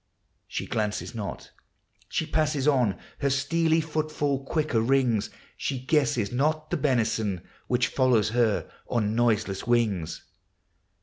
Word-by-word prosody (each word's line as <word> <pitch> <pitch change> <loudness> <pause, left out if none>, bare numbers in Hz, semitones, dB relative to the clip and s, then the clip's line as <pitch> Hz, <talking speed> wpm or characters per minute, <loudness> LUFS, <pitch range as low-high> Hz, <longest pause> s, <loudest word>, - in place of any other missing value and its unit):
She - - -4
glances 105 +2 -2
not; 105 -4 -6 0.6
she 160 - -1
passes 155 -3 0
on; 125 -10 +3 0.2
Her 140 - +1
steely 160 +4 +2
footfall 155 -3 -1
quicker 150 -5 0
rings; 120 -3 +2 0.3
She 135 - -2
guesses 125 -5 +1
not 155 +4 0
the 175 - +1
benison 110 - +1 0.3
Which 125 0 +2
follows 120 -6 +2
her 115 -2 +1 0.2
on 105 -3 +1
noiseless 110 -3 +1
wings. 110 -9 +1
125 Hz, 120 wpm, -27 LUFS, 110-150 Hz, 0.6 s, on